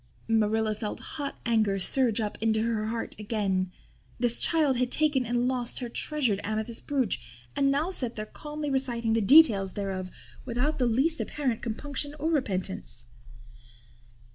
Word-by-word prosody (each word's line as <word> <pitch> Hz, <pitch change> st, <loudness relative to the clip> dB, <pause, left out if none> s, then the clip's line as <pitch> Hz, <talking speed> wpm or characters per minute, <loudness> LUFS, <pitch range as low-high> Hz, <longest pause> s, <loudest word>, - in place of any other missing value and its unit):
Marilla 220 Hz, 0 st, +2 dB
felt 210 Hz, 0 st, -5 dB
hot 285 Hz, -2 st, -5 dB
anger 220 Hz, -4 st, +2 dB
surge 235 Hz, +4 st, +3 dB
up 210 Hz, -2 st, -2 dB
into 220 Hz, -1 st, +2 dB
her 225 Hz, -2 st, -1 dB
heart 225 Hz, +1 st, -3 dB
again. 195 Hz, -4 st, -1 dB, 0.5 s
This 240 Hz, -1 st, +1 dB
child 300 Hz, -6 st, +2 dB
had 250 Hz, 0 st, +1 dB
taken 290 Hz, -4 st, +3 dB
and 240 Hz, +1 st, +1 dB
lost 250 Hz, -2 st, -1 dB
her 245 Hz, -2 st, -4 dB
treasured 245 Hz, -5 st, 0 dB
amethyst 220 Hz, +2 st, -4 dB
brooch 260 Hz, -, 0 dB, 0.4 s
and 275 Hz, -, +3 dB
now 295 Hz, +6 st, +1 dB
sat 250 Hz, -10 st, -3 dB
there 215 Hz, -, -4 dB
calmly 295 Hz, +4 st, -5 dB
reciting 240 Hz, -4 st, 0 dB
the 225 Hz, -, +2 dB
details 210 Hz, -, +6 dB
thereof 190 Hz, -2 st, -3 dB, 0.3 s
without 255 Hz, +5 st, -1 dB
the 250 Hz, -, +3 dB
least 275 Hz, +8 st, +2 dB
apparent 260 Hz, -6 st, -2 dB
compunction 285 Hz, +5 st, -4 dB
or 315 Hz, +3 st, -1 dB
repentance. 190 Hz, -, -2 dB
235 Hz, 150 wpm, -28 LUFS, 215-275 Hz, 0.5 s, details